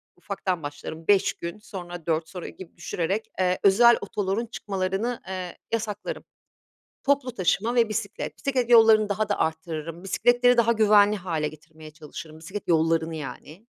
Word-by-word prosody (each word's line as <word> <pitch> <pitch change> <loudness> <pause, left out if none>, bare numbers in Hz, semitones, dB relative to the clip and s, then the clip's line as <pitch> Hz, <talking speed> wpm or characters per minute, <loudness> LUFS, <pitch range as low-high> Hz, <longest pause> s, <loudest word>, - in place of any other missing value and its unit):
ufaktan 185 -2 -3
başlarım, 155 +3 -7
5 200 -2 +4
gün, 170 +4 -7
sonra 175 -5 -8
4 160 -1 0
sonra 180 -3 -7
gibi 185 -3 -13
düşürerek, 190 +6 -3
eee, 185 0 +1
özel 235 +4 +6
otoların 200 +2 -2
çıkmalarını, 200 +2 -3
eee, 185 -2 -5
yasaklarım. 215 -2 -3 0.8
Toplu 275 -3 +1
taşıma 200 +5 +1
ve 230 -2 +3
bisiklet. 215 -1 -4
Bisiklet 255 -3 -1
yollarını 220 -2 +6
daha 210 +1 -1
da - - 0
arttırırım, 160 +1 -3
bisikletleri 245 +5 +3
daha 235 0 +4
güvenli 210 -2 +5
hâle 165 -6 -2
getirmeye 155 0 -13
çalışırım, 155 0 -10
bisiklet 185 +5 -7
yollarını 165 0 +2
yani. 155 +5 -9
190 Hz, 145 wpm, -25 LUFS, 165-220 Hz, 0.8 s, özel